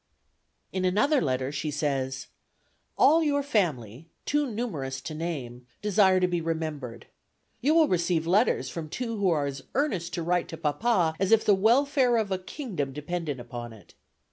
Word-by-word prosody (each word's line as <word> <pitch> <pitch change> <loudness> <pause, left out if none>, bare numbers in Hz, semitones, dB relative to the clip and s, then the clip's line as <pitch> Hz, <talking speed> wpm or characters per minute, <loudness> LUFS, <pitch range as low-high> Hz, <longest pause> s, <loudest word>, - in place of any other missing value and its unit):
In 185 - -1
another 215 +11 +3
letter 130 -1 -1
she 150 +1 -3
says: 135 -3 -2 0.7
"All 320 +4 +5
your 285 -2 +1
family, 160 - -1 0.2
too 295 -2 +1
numerous 155 - -4
to 155 - -6
name, 135 -7 -5 0.2
desire 195 -2 +4
to 180 - +2
be 175 -1 -1
remembered. 155 -7 -4 0.6
You 300 +5 +3
will 320 -2 +6
receive 170 -2 +1
letters 185 - +2
from 155 +3 -6
two 230 +4 -4
who 200 -2 +2
are 150 -4 +1
as 140 -1 -5
earnest 200 - -1
to 170 - -3
write 175 +1 0
to 165 - -7
papa 160 - +1
as 195 +1 0
if 225 -1 +5
the 205 - +5
welfare 245 +4 +3
of 215 -3 -1
a 190 - 0
kingdom 185 - -5
depended 150 -1 -4
upon 120 -1 -7
it." 105 -5 -17
170 Hz, 170 wpm, -27 LUFS, 145-220 Hz, 0.7 s, will